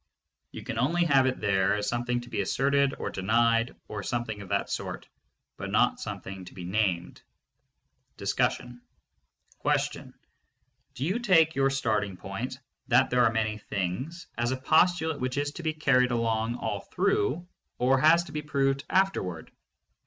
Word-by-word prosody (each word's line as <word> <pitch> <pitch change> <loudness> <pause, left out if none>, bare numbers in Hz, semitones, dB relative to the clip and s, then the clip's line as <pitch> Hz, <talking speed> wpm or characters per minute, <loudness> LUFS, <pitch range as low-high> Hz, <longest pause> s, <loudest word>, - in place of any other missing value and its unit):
You - - -9
can 115 - -4
only 170 +8 +2
have 135 -4 +4
it 130 - -1
there 95 -1 +2
as 105 0 -2
something 120 +1 -1
to 120 - -12
be - - 0
asserted 140 +6 +1
or - - -4
denied 115 +4 +2
or 105 -1 -5
something 110 -1 -3
of 100 - -10
that - - -1
sort, - - -4 0.5
but - - -5
not - - +2
something 95 -1 -6
to 90 - -13
be 90 - -7
named. 90 -2 -1 1.0
DISCUSSION. 125 0 -1 0.8
Do 130 - -5
you 190 +8 0
take 170 -8 +4
your 135 0 +2
starting 105 -8 -1
point 115 +8 -5 0.3
"That 130 +1 +4
there 125 0 +4
are 115 - +3
many 110 -1 -1
things" 115 - -4
as 120 0 +1
a 130 - -1
postulate 160 +2 +2
which 130 +1 -2
is 145 0 0
to 160 - -8
be 160 -1 0
carried 135 -5 +3
along 115 -1 0
all - - -3
through, 410 - 0 0.3
or 130 +2 +3
has 165 +4 +5
to - - -11
be 150 - -3
proved 140 -2 0
afterward? 95 - 0
125 Hz, 160 wpm, -28 LUFS, 110-145 Hz, 1.0 s, has